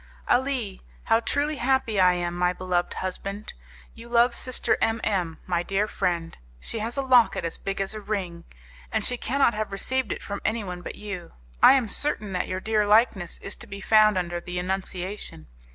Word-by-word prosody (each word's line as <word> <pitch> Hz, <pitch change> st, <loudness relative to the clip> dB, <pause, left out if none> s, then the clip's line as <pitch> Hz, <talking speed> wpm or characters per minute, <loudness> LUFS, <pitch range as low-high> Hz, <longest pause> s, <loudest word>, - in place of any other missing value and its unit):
"Ah! 245 Hz, -, +4 dB, 0.6 s
how 225 Hz, 0 st, +3 dB
truly 290 Hz, +5 st, -1 dB
happy 245 Hz, -5 st, +1 dB
I 180 Hz, -1 st, +6 dB
am, 175 Hz, -1 st, -2 dB
my 180 Hz, 0 st, +1 dB
beloved 180 Hz, -1 st, -1 dB
husband! 195 Hz, +2 st, -5 dB, 0.4 s
You 230 Hz, +1 st, -12 dB
love 235 Hz, +1 st, +4 dB
Sister 255 Hz, +1 st, +1 dB
M 225 Hz, 0 st, +2 dB
M, 180 Hz, -6 st, -1 dB
my 175 Hz, -2 st, 0 dB
dear 195 Hz, +4 st, 0 dB
friend. 175 Hz, -5 st, -2 dB, 0.2 s
She 225 Hz, -, -5 dB
has 230 Hz, +4 st, -4 dB
a 275 Hz, -, 0 dB
locket 245 Hz, -9 st, +4 dB
as 165 Hz, -, -3 dB
big 195 Hz, 0 st, -4 dB
as 195 Hz, +2 st, -1 dB
a 215 Hz, -, -6 dB
ring, 185 Hz, -5 st, -4 dB, 0.5 s
and -, -, +1 dB
she 250 Hz, -, +1 dB
cannot 250 Hz, +1 st, +2 dB
have 215 Hz, -1 st, -3 dB
received 255 Hz, +4 st, -1 dB
it -, -, -4 dB
from 200 Hz, 0 st, -5 dB
anyone 200 Hz, -5 st, -2 dB
but -, -, -7 dB
you. 200 Hz, -5 st, -7 dB, 0.3 s
I -, -, +9 dB
am 260 Hz, -4 st, +2 dB
certain 215 Hz, -3 st, +1 dB
that 180 Hz, -1 st, -1 dB
your 185 Hz, -, -3 dB
dear 215 Hz, +1 st, +1 dB
likeness 210 Hz, -5 st, +3 dB
is -, -, -3 dB
to -, -, -10 dB
be 200 Hz, -, -7 dB
found 215 Hz, 0 st, +5 dB
under 175 Hz, -1 st, -2 dB
the 180 Hz, +1 st, -6 dB
Annunciation. 185 Hz, -, -3 dB
200 Hz, 190 wpm, -25 LUFS, 180-230 Hz, 0.6 s, I